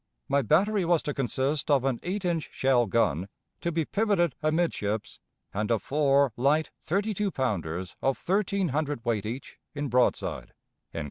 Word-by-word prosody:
My 140 +1 +2
battery 190 - +3
was 170 -1 +2
to 145 - -2
consist 135 +3 -1
of 140 -3 +4
an 130 -3 0
eight 190 +2 -3
inch 170 -3 -1
shell 130 -3 +2
gun, 95 -4 +1 0.3
to 170 - -2
be 160 -1 0
pivoted 200 - +1
amidships, 155 -10 -1 0.3
and 105 +1 -1
of 115 -4 +1
four 140 -3 +3
light 145 +5 +2
thirty 200 +6 -1
two 205 +1 0
pounders 90 - -2
of 135 0 +1
thirteen 195 -1 0
hundred 145 -3 -2
weight 110 -3 0
each, 125 +5 -7 0.2
in 145 -1 -2
broadside." 125 +1 0
140 Hz, 155 wpm, -28 LUFS, 120-170 Hz, 0.3 s, of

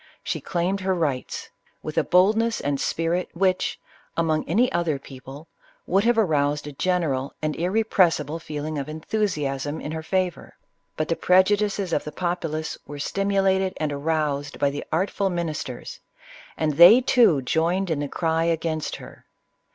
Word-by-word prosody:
She - - -3
claimed 185 +2 -1
her 190 0 0
rights, 145 -7 -3 0.3
with - - -5
a - - +3
boldness 220 +5 +3
and 140 -1 -2
spirit 170 +2 -1
which, 185 +1 0 0.4
among 160 -2 +1
any 235 +9 +3
other 170 -4 0
people, 135 +3 -11 0.4
would 195 +3 +2
have 240 0 +3
aroused 150 -7 +1
a 150 - -6
general 145 -4 -1
and 155 -1 -2
irrepressible 175 -5 +1
feeling 150 -1 -4
of 140 - -5
enthusiasm 155 -5 -2
in 150 - -6
her 160 0 -4
favor; 185 +1 -2 0.4
but 155 - -1
the 165 - 0
prejudices 195 0 +2
of - - +1
the 150 - -6
populace 165 -2 -3
were 145 - -7
stimulated 195 +3 +1
and 150 -2 -2
aroused 145 -1 -1
by 140 - +1
the 145 - -5
artful 190 +4 0
ministers, 160 -8 -4 0.6
and 155 -2 -1
they, 175 +8 +10
too, 235 - +4
joined 170 +6 0
in 155 - 0
the 145 - -2
cry 165 +2 0
against 160 -2 -1
her. - - -13
165 Hz, 150 wpm, -24 LUFS, 150-190 Hz, 0.6 s, they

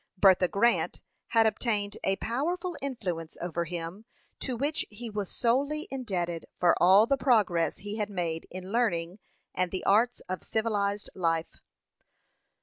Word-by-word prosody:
Bertha 185 -1 +5
Grant 235 +6 +1 0.2
had 225 -1 +4
obtained 215 -2 0
a 195 - +2
powerful 340 - -2
influence 185 - -4
over 170 0 -2
him, 175 +5 -6 0.3
to 255 -3 -3
which 290 +5 0
he 225 +2 -8
was 205 -2 -3
solely 280 - 0
indebted 180 -10 -3
for 175 -1 +4
all 190 +4 +7
the 275 +3 +1
progress 210 -11 +2
he 205 +2 -6
had 210 -1 -1
made 170 -4 -3
in 185 +1 -7
learning 190 -6 0 0.3
and 185 -1 0
the 185 +1 -4
arts 230 +5 +3
of 185 -2 -5
civilized 205 -2 -1
life. 165 -2 -1
205 Hz, 145 wpm, -29 LUFS, 180-235 Hz, 0.3 s, all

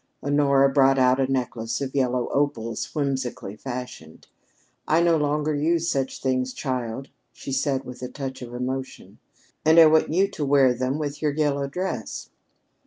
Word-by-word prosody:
Honora 140 -1 +3
brought 135 -1 +4
out 130 0 +4
a 135 0 +1
necklace 115 -3 -2
of 135 -2 -4
yellow 125 -2 0
opals 120 -6 -1
whimsically 130 -7 -2
fashioned. 120 -10 -8 0.6
"I 160 - +3
no 170 -1 +4
longer 150 0 0
use 165 +3 +1
such 135 -1 -2
things, 130 -1 0
child," 130 -1 -4 0.2
she - - -8
said 135 0 0
with 125 -1 -10
a 125 - -4
touch 135 0 -6
of 120 -1 -8
emotion. 130 +1 -5 0.4
"And 160 +1 +4
I 165 - +10
want 155 0 +4
you 190 +5 +3
to 195 -6 -5
wear 135 -2 +4
them 130 +3 -2
with 145 -1 -4
your 150 -2 +1
yellow 140 -2 0
dress." 140 -6 -5
135 Hz, 165 wpm, -24 LUFS, 125-145 Hz, 0.6 s, I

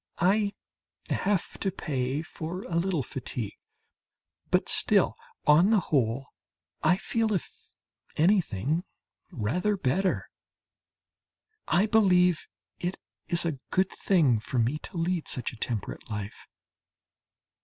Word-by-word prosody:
I 200 +3 +2 0.6
have 195 -2 0
to 195 - 0
pay 140 -5 -2
for 170 +3 -6
a 170 - -5
little 170 -4 +1
fatigue, 120 -5 -5 0.9
but - - +2
still - - +3 0.3
on 160 +6 +6
the 220 -2 +5
whole 135 -5 0 0.5
I 180 - +4
feel 225 +2 0
if 185 - -5 0.4
anything 160 - +2 0.5
rather 180 - 0
better. 185 +5 0 1.4
I 190 +4 +4
believe 180 -6 +4 0.3
it 175 +2 -2 0.3
is 170 0 0
a 155 -5 -2
good 185 0 +2
thing 150 - +3
for 120 +4 -4
me 120 +6 +1
to 175 - -8
lead 170 0 0
such 125 -1 0
a - - -9
temperate 115 -1 -4
life. 105 -2 -6
170 Hz, 115 wpm, -28 LUFS, 130-190 Hz, 1.4 s, on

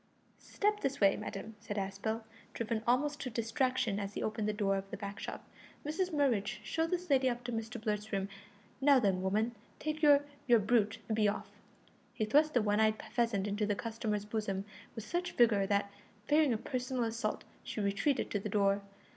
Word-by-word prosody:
"Step 415 0 0
this 275 -5 -2
way, 195 -1 +5
madam," 215 +3 -6
said 205 -1 -5
Aspel, 200 +3 -2 0.3
driven 230 -1 -1
almost 290 +5 +2
to 255 - -3
distraction 230 -1 0
as 200 0 -5
he - - -2
opened 215 -1 -1
the - - +2
door 205 -2 +1
of 195 0 -4
the - - -5
back 200 0 -6
shop. - - -6 0.4
"Mrs 340 +5 0
Murridge, 260 -10 +1
show 325 0 0
this 360 +1 -2
lady 260 -1 +4
up 245 0 -3
to 245 - -4
Mr 225 +1 -4
Blurt's 215 0 -2
room. 195 -1 0 0.5
Now 280 0 +6
then, 195 -5 +1
woman, 215 +5 +1 0.2
take 305 0 -3
your 290 -2 +6 0.2
your 240 -2 +7
brute, 215 0 +2
and 220 - 0
be 215 -1 +3
off." 205 0 -2 0.6
He 215 - 0
thrust 300 +7 +3
the 240 - +4
one 205 0 +2
eyed 220 0 +3
pheasant 230 -5 +1
into 205 +1 -1
the 205 - +1
customer's 215 0 -2
bosom 205 -2 -2 0.3
with 225 - -5
such 350 +8 -2
vigour 210 -5 +4
that, 200 0 +1 0.3
fearing 300 -2 +4
a 225 - +1
personal 250 +1 -2
assault, 225 -1 -2 0.2
she - - -5
retreated 200 +7 +1
to 205 - 0
the 210 - -4
door. 200 0 +2
220 Hz, 195 wpm, -33 LUFS, 205-255 Hz, 0.6 s, your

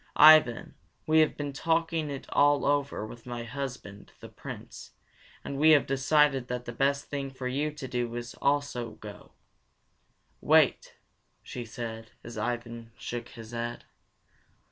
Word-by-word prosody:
Ivan, 150 -6 +7 0.3
we 160 0 +4
have 155 - +3
been 145 -1 -4
talking 165 +1 0
it 140 -2 -6
all 145 -1 +4
over 140 -5 0
with 115 +2 -11
my 120 -1 -5
husband, 125 -5 -7
the - - -10
Prince, - - -10 0.5
and 140 - -5
we 155 +2 +6
have 135 - -2
decided 135 -1 +2
that 125 0 -4
the - - -5
best 140 +3 0
thing 140 -1 -4
for 130 -1 -6
you 140 +4 -1
to 140 -3 -7
do 120 -2 -2
is 120 0 -5
to - - -15
go - - -22
also. 140 -5 -2 1.1
Wait," - - +3 0.5
she 120 -1 -7
said 110 -1 -7
as 115 +1 -9
Ivan 115 0 -4
shook 120 0 -6
his 115 -1 -11
head. 120 0 -5
130 Hz, 150 wpm, -28 LUFS, 120-145 Hz, 1.1 s, Ivan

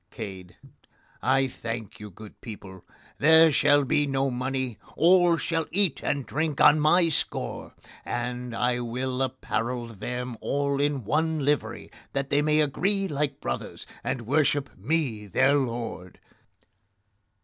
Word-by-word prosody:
CADE: 95 -6 -8 0.7
I 135 +1 +3
thank 115 -3 -6
you, 105 0 -8
good 105 +2 -14
people: 95 -5 -10 0.4
there 160 +2 +7
shall 145 0 +4
be 145 +1 +1
no 135 0 0
money; 130 -1 -3 0.2
all 175 0 +5
shall 165 -1 -1
eat 190 -4 +1
and 140 -3 -1
drink 155 -1 -2
on 150 +1 +6
my 165 +3 +4
score; 155 - -2 0.3
and 125 0 -4
I 125 +1 +1
will 125 +2 -3
apparel 125 -2 -2
them 125 +3 -5
all 140 0 0
in 145 -3 0
one 155 +4 0
livery, 145 0 -1 0.2
that 135 0 -2
they 145 +1 +3
may 150 +1 +3
agree 195 +7 0
like 145 -3 -2
brothers, 65 0 -5 0.2
and 125 - -2
worship 145 +1 +1
me, 115 - -2
their 135 +8 +3
lord. 115 -9 -3
135 Hz, 135 wpm, -26 LUFS, 120-150 Hz, 0.7 s, there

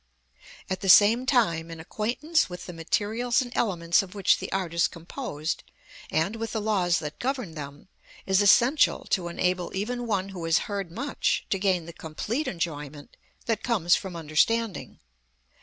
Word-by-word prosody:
At 190 -1 -3
the 195 - -1
same 225 +7 +7
time, 170 -11 +2
an 165 -1 -8
acquaintance 240 - -1
with 180 0 -8
the 180 - -8
materials 215 +9 0
and 245 -2 -4
elements 170 -6 +2
of 195 0 -10
which 200 - +3
the - - -6
art 185 -4 -2
is 170 0 +3
composed 165 - -5 0.5
and 170 +8 0
with 225 0 -4
the 220 - -1
laws 190 -5 +1
that 150 -1 -6
govern 250 -9 -2
them, 145 +1 -9 0.4
is 190 +1 +3
essential 240 +8 +4
to 180 -3 +1
enable 180 +1 -1
even 240 +5 -3
one 195 -3 -1
who 185 -3 -7
has 165 +1 +3
heard 200 -3 -4
much 270 +10 -1
to 195 - +1
gain 185 -4 +1
the 170 - -9
complete 210 - -4
enjoyment 150 -4 -5 0.3
that 225 -2 0
comes 195 -8 +2
from 190 -3 -5
understanding. 175 +8 0
190 Hz, 165 wpm, -26 LUFS, 170-225 Hz, 0.5 s, same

